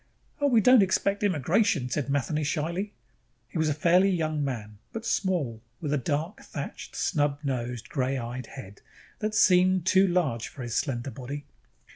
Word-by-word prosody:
"Oh, 285 - +4
we 235 -5 +5
don't 250 +2 +7
expect 200 +1 +1
immigration," 180 - +2
said 140 +2 -2
Matheny 145 +2 0
shyly. 170 +7 -2 0.6
He 165 - -4
was 160 -1 +2
a - - +2
fairly 180 +5 +4
young 155 -5 0
man, 105 -6 -5
but 225 0 -6
small, 170 - 0 0.2
with 150 -3 -2
a 145 - +2
dark 155 - -2
thatched, - - -7
snub 145 -4 +1
nosed, 125 -4 -3
gray 135 -1 -1
eyed 120 0 -5
head 105 -7 -11 0.4
that 215 0 -2
seemed 185 -2 +4
too 190 +1 +5
large 155 -11 0
for 130 - -9
his 120 -2 -4
slender 130 -1 -1
body. 140 +2 -7
150 Hz, 165 wpm, -27 LUFS, 130-185 Hz, 0.6 s, don't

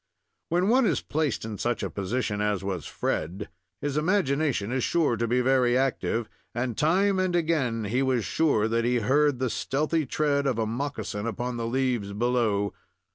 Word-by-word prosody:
When 175 +3 +2
one 245 +1 +4
is - - +1
placed 150 -7 -1
in 110 -2 -6
such 120 -1 -1
a - - -2
position 105 +1 -2
as 105 -2 0
was 95 -5 -3
Fred, 90 +7 -3 0.3
his 145 0 -2
imagination 150 - +1
is 130 -1 0
sure 160 -8 +2
to 115 0 -1
be 125 +2 +2
very 125 -1 +3
active, 125 -3 0 0.3
and, 120 -1 -1
time 190 - +2
and 185 -1 +1
again, 150 -10 +1
he 115 +6 0
was 130 -4 +1
sure 140 -10 +2
that 115 +1 0
he 120 +1 +1
heard 135 +5 +2
the 130 +1 0
stealthy 155 +2 -1
tread 140 0 +1
of 130 -4 0
a 110 - +1
moccasin 115 -3 -3
upon 120 +1 -3
the 115 -1 -2
leaves 120 -5 -1
below. 110 -3 +1
125 Hz, 180 wpm, -27 LUFS, 115-150 Hz, 0.3 s, one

